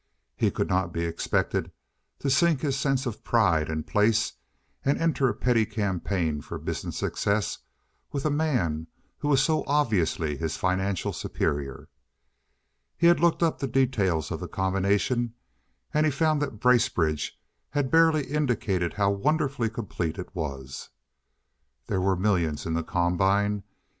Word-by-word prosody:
He -, -, +2 dB
could -, -, -1 dB
not 95 Hz, -2 st, 0 dB
be 85 Hz, 0 st, -2 dB
expected 85 Hz, 0 st, -1 dB, 0.5 s
to 140 Hz, -, -2 dB
sink 155 Hz, 0 st, +3 dB
his 140 Hz, -3 st, 0 dB
sense 135 Hz, -1 st, 0 dB
of 120 Hz, -4 st, -5 dB
pride 85 Hz, -10 st, +2 dB
and 80 Hz, -1 st, -3 dB
place, 110 Hz, +2 st, +2 dB, 0.5 s
and 140 Hz, -, +2 dB
enter 140 Hz, -6 st, +2 dB
a -, -, -1 dB
petty 120 Hz, -1 st, +2 dB
campaign 95 Hz, -7 st, -1 dB
for -, -, -7 dB
business -, -, -4 dB
success 100 Hz, -2 st, -1 dB, 0.5 s
with 140 Hz, 0 st, -3 dB
a 155 Hz, -, +2 dB
man 110 Hz, -, 0 dB, 0.3 s
who 145 Hz, -, -2 dB
was 135 Hz, -2 st, +4 dB
so 155 Hz, -1 st, +1 dB
obviously 95 Hz, -, +1 dB
his 80 Hz, 0 st, -3 dB
financial 95 Hz, 0 st, 0 dB
superior. 70 Hz, -4 st, -3 dB, 1.1 s
He 170 Hz, -, +1 dB
had 170 Hz, -1 st, +6 dB
looked 170 Hz, +1 st, +3 dB
up 165 Hz, -, +1 dB
the 135 Hz, -, -1 dB
details 115 Hz, -, +1 dB
of -, -, -3 dB
the -, -, -5 dB
combination, 100 Hz, +5 st, 0 dB, 0.6 s
and 150 Hz, -, +3 dB
he 155 Hz, -, +3 dB
found 155 Hz, +1 st, +1 dB
that 125 Hz, -7 st, -3 dB
Bracebridge 85 Hz, -11 st, +2 dB, 0.3 s
had 145 Hz, -3 st, -1 dB
barely 160 Hz, -2 st, +5 dB
indicated 115 Hz, -, 0 dB
how 100 Hz, -1 st, +2 dB
wonderfully 135 Hz, +2 st, 0 dB
complete 100 Hz, -6 st, -4 dB
it 90 Hz, -, -7 dB
was. 70 Hz, -5 st, -5 dB, 1.0 s
There 95 Hz, -3 st, -1 dB
were 95 Hz, 0 st, +2 dB
millions 90 Hz, -6 st, 0 dB
in 80 Hz, -, -2 dB
the 85 Hz, -, +1 dB
combine. 95 Hz, +4 st, +1 dB
105 Hz, 150 wpm, -27 LUFS, 85-135 Hz, 1.1 s, had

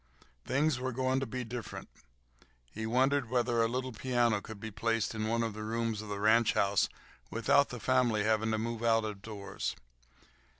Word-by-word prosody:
Things 140 Hz, 0 st, +2 dB
were 130 Hz, +1 st, -2 dB
going 130 Hz, +1 st, +1 dB
to 135 Hz, -, -3 dB
be 125 Hz, -1 st, -4 dB
different. 120 Hz, -1 st, -6 dB, 0.8 s
He 110 Hz, +1 st, -4 dB
wondered 130 Hz, +1 st, +2 dB
whether 120 Hz, -1 st, +2 dB
a 115 Hz, -, +3 dB
little 130 Hz, +2 st, -2 dB
piano 120 Hz, -3 st, +1 dB
could 110 Hz, 0 st, -9 dB
be 110 Hz, +1 st, -6 dB
placed 115 Hz, +3 st, 0 dB
in 110 Hz, -1 st, -2 dB
one 115 Hz, +1 st, +1 dB
of 115 Hz, -2 st, -2 dB
the 110 Hz, -, -7 dB
rooms 115 Hz, -1 st, -1 dB
of 110 Hz, -, -9 dB
the 100 Hz, -1 st, -3 dB
ranch 110 Hz, +2 st, +4 dB
house 100 Hz, 0 st, +2 dB, 0.4 s
without -, -, +3 dB
the -, -, -6 dB
family 115 Hz, -5 st, +2 dB
having 110 Hz, +1 st, +2 dB
to 110 Hz, -, +1 dB
move 115 Hz, +1 st, -3 dB
out 115 Hz, -1 st, +3 dB
of 105 Hz, -2 st, -5 dB
doors. 100 Hz, -2 st, -5 dB
115 Hz, 185 wpm, -32 LUFS, 110-125 Hz, 0.8 s, ranch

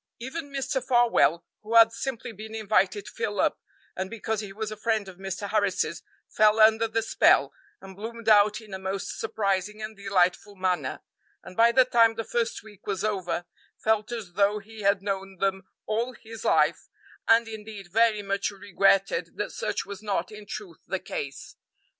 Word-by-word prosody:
Even 285 Hz, +5 st, -6 dB
Mr. 270 Hz, -2 st, -2 dB
Farwell, 240 Hz, -, +3 dB, 0.2 s
who 220 Hz, +2 st, -4 dB
had 230 Hz, 0 st, +8 dB
simply 235 Hz, 0 st, -4 dB
been 220 Hz, +1 st, -9 dB
invited 205 Hz, -2 st, +1 dB
to -, -, -9 dB
fill 205 Hz, -2 st, -3 dB
up -, -, +2 dB, 0.4 s
and 190 Hz, 0 st, -3 dB
because 220 Hz, -1 st, -3 dB
he 205 Hz, -2 st, -6 dB
was 215 Hz, +1 st, -4 dB
a -, -, -4 dB
friend 215 Hz, -1 st, -1 dB
of 185 Hz, -2 st, -11 dB
Mr. 195 Hz, +1 st, -5 dB
Harris's, 200 Hz, -5 st, 0 dB, 0.3 s
fell 215 Hz, 0 st, +3 dB
under 220 Hz, +1 st, +6 dB
the 225 Hz, 0 st, -1 dB
spell, -, -, +4 dB, 0.3 s
and 190 Hz, 0 st, -11 dB
bloomed 225 Hz, +2 st, -8 dB
out 210 Hz, 0 st, +5 dB
in 215 Hz, -3 st, -13 dB
a 190 Hz, -, -4 dB
most 190 Hz, 0 st, -4 dB
surprising 210 Hz, -2 st, -1 dB
and 215 Hz, 0 st, -6 dB
delightful 200 Hz, 0 st, +1 dB
manner, 180 Hz, -8 st, -1 dB, 0.4 s
and -, -, -11 dB
by 230 Hz, +3 st, +6 dB
the 260 Hz, +1 st, +5 dB
time 230 Hz, -2 st, +4 dB
the 225 Hz, -, -3 dB
first 230 Hz, -1 st, -2 dB
week 210 Hz, -3 st, -16 dB
was 195 Hz, -3 st, -2 dB
over 190 Hz, -4 st, -1 dB, 0.3 s
felt 220 Hz, +1 st, 0 dB
as 220 Hz, -7 st, -6 dB
though 200 Hz, +2 st, +3 dB
he 215 Hz, +1 st, -10 dB
had 200 Hz, -1 st, +2 dB
known 195 Hz, -1 st, -3 dB
them 190 Hz, 0 st, -1 dB, 0.2 s
all 220 Hz, +2 st, 0 dB
all 255 Hz, -, -9 dB
his 225 Hz, -1 st, -11 dB
life, -, -, +2 dB, 0.4 s
and, 230 Hz, 0 st, +5 dB
indeed, 210 Hz, -4 st, -9 dB
very 225 Hz, -2 st, +3 dB
much 200 Hz, 0 st, -1 dB
regretted 195 Hz, -1 st, +1 dB
that -, -, -2 dB
such -, -, -3 dB
was 200 Hz, 0 st, -8 dB
not 200 Hz, -4 st, -2 dB
in 210 Hz, -1 st, -11 dB
truth 355 Hz, -, -8 dB
the -, -, -1 dB
case. 460 Hz, -4 st, -6 dB
210 Hz, 185 wpm, -27 LUFS, 195-225 Hz, 0.4 s, had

